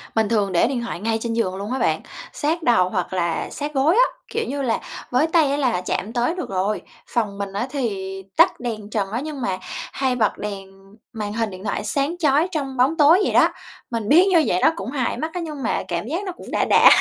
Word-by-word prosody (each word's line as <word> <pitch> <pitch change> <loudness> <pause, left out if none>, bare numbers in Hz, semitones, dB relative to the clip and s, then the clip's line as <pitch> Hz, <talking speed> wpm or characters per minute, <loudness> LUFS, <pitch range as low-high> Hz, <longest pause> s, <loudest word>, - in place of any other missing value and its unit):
Mình 220 -2 +2
thường 205 -4 +1
để 175 +4 +3
điện 255 -2 -2
thoại 235 -7 -5
ngay 225 +3 0
trên 230 0 -2
giường 215 -5 0
luôn 200 +4 -5
á 265 - -1
bạn, - - +1 0.3
sát 320 +3 -1
đầu 185 -9 +4
hoặc 185 -2 -2
là 170 -2 -1
sát 295 +1 -5
gối 290 +6 +3
á, - - +7 0.3
kiểu 455 0 -1
như 280 +1 -3
là, 240 -4 0 0.3
với 255 +6 +3
tay 320 -4 +3
á 285 - 0
là 250 -10 +1
chạm 200 +4 -3
tới 245 +7 +1
được 360 - -5
rồi. 195 +2 -1 0.3
Phòng 210 -4 -1
mình 200 -1 -4
á 205 +6 -2
thì 195 -8 -3
tắt - - +5
đèn 220 -4 -5
trần 200 -3 -2
á 230 - -1
nhưng 300 -3 -5
mà 190 -5 -1 0.4
hay 260 -2 0
bật 220 -4 +1
đèn 195 -2 -6 0.4
màn 210 -2 -4
hình 225 0 -1
điện 185 -1 -10
thoại - - -2
sáng 285 +4 0
chói 305 0 +3
trong 275 -5 -3
bóng 265 +6 +3
tối 315 +4 +6
vậy - - 0
đó. - - +6 0.4
Mình 225 -3 -2
biết 340 +6 +7
như 345 -5 +5
vậy 180 - +2
nó - - +5
cũng 255 - -5
hại 255 -5 -1
mắt 315 +5 -4
á, 360 - -3
nhưng 305 -4 -6
mà - - 0
cảm 170 +1 -2
giác 335 +9 -2
nó 375 - -3
cũng 355 - -11
đã - - +1
đã - - +7
240 Hz, 245 wpm, -22 LUFS, 205-295 Hz, 0.4 s, á